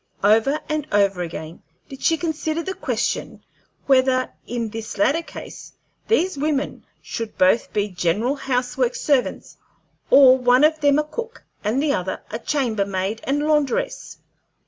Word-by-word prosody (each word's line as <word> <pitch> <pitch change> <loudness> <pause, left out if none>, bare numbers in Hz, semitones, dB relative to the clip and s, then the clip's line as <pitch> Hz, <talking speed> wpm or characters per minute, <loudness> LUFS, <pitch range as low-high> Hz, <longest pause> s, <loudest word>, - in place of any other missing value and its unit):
Over 225 +8 +3
and 305 -1 -2
over 200 -3 +2
again 165 -1 -7 0.3
did 270 -1 -11
she 325 - +2
consider 320 0 -2
the 380 - -3
question - - -3 0.4
whether, 260 -1 +3 0.2
in 235 -2 -3
this 220 0 -7
latter 275 +11 +2
case, - - -10 0.3
these 375 -8 +1
women 290 -1 -2 0.2
should 230 -1 -6
both 185 +5 +3
be 205 0 0
general 185 +8 0
house 250 -3 -2
work 250 -1 +1
servants, 280 -4 -1 0.5
or 265 -2 +8
one 250 +2 +4
of 310 +1 +4
them 285 -1 +3
a 300 - +2
cook 460 +10 -7 0.2
and 230 +7 0
the 295 -2 +2
other 185 -3 -2
a - - -4
chamber 240 -7 0
maid 195 +2 -3
and 290 +2 0
laundress. 310 - -1
260 Hz, 150 wpm, -22 LUFS, 215-300 Hz, 0.5 s, or